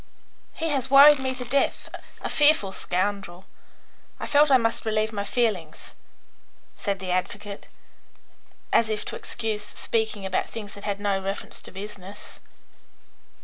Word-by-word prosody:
"He 325 Hz, 0 st, -2 dB
has 270 Hz, -3 st, 0 dB
worried 280 Hz, +1 st, +8 dB
me 260 Hz, 0 st, -2 dB
to 250 Hz, -, -6 dB
death 275 Hz, +3 st, 0 dB, 0.3 s
a -, -, -3 dB
fearful 295 Hz, -10 st, +4 dB
scoundrel. 190 Hz, -1 st, -2 dB, 0.7 s
I -, -, -4 dB
felt 295 Hz, +1 st, +4 dB
I 265 Hz, -, +7 dB
must 230 Hz, -2 st, -1 dB
relieve 220 Hz, 0 st, 0 dB
my 200 Hz, -1 st, -2 dB
feelings," 200 Hz, -7 st, -2 dB, 0.8 s
said 200 Hz, -2 st, -2 dB
the 185 Hz, -1 st, -4 dB
advocate, 200 Hz, +3 st, -3 dB, 1.1 s
as 225 Hz, -1 st, +4 dB
if 215 Hz, -1 st, -2 dB
to -, -, -5 dB
excuse 215 Hz, -2 st, -3 dB
his -, -, -14 dB
speaking 220 Hz, -3 st, -1 dB
about 190 Hz, -, -1 dB
things 210 Hz, -3 st, -8 dB
that 200 Hz, -, -10 dB
had 200 Hz, -1 st, -2 dB
no 200 Hz, -1 st, 0 dB
reference 195 Hz, +1 st, -5 dB
to -, -, -10 dB
business. 200 Hz, 0 st, -10 dB
210 Hz, 145 wpm, -25 LUFS, 195-245 Hz, 1.1 s, worried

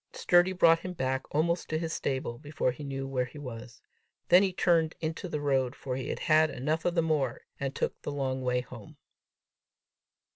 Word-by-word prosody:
Sturdy 175 Hz, +1 st, +4 dB
brought 165 Hz, -3 st, +5 dB
him 180 Hz, +1 st, -6 dB
back 130 Hz, -4 st, -1 dB
almost 170 Hz, +3 st, 0 dB
to 155 Hz, -, 0 dB
his 165 Hz, 0 st, -3 dB
stable, 130 Hz, -3 st, -2 dB
before 145 Hz, -3 st, -1 dB
he 135 Hz, +4 st, -9 dB
knew 135 Hz, -1 st, -4 dB
where 130 Hz, -2 st, 0 dB
he 125 Hz, -, -12 dB
was. 120 Hz, -4 st, -9 dB, 0.5 s
Then 180 Hz, -, +8 dB
he 195 Hz, -1 st, +2 dB
turned 165 Hz, -3 st, +2 dB
into 165 Hz, +3 st, -4 dB
the 150 Hz, -, -2 dB
road, 135 Hz, -3 st, +1 dB
for 130 Hz, -2 st, -4 dB
he 130 Hz, -, -4 dB
had -, -, -2 dB
had 155 Hz, 0 st, +4 dB
enough 155 Hz, +5 st, -2 dB
of 175 Hz, -, +1 dB
the 165 Hz, -, +3 dB
moor, 145 Hz, -6 st, 0 dB, 0.2 s
and 140 Hz, 0 st, -3 dB
took -, -, -2 dB
the -, -, -4 dB
long 135 Hz, -2 st, -2 dB
way 125 Hz, -1 st, +1 dB
home. 120 Hz, -3 st, -12 dB
145 Hz, 195 wpm, -29 LUFS, 130-165 Hz, 0.5 s, Then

